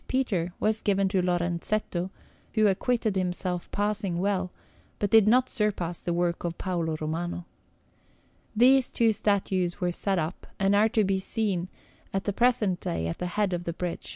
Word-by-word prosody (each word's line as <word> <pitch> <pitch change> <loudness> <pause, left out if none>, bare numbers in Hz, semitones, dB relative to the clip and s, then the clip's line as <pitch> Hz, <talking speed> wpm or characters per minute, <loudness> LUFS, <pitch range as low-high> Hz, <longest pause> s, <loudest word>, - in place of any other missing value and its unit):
Peter, 200 -10 0
was 215 +1 +1
given 195 -2 +2
to 190 -1 +1
Lorenzetto, 175 +1 -1 0.5
who 215 -1 +4
acquitted 215 +1 +1
himself 180 -1 -1
passing 205 -3 -1
well, 190 0 0 0.5
but 205 -2 -1
did 220 -2 +6
not 250 +3 +5
surpass 195 -7 -1
the 175 - -2
work 170 0 0
of 170 -1 -3
Paolo 170 -4 -2
Romano. 170 +3 -3 1.1
These 255 +3 +5
two 230 -1 +3
statues 190 -4 0
were 180 -2 0
set 195 +2 -1
up, 160 +2 -3
and 195 0 +2
are 215 +2 +4
to 220 -1 +2
be 195 -1 +1
seen 190 -3 -1 0.5
at 195 - 0
the 205 - -1
present 220 -6 +2
day 80 -1 -3
at 85 - -4
the 180 - -2
head 195 +1 0
of 175 0 -3
the 170 - -2
bridge. 180 +1 -2
[Illustration: - - -19
S. - - -7
190 Hz, 180 wpm, -27 LUFS, 175-210 Hz, 1.1 s, did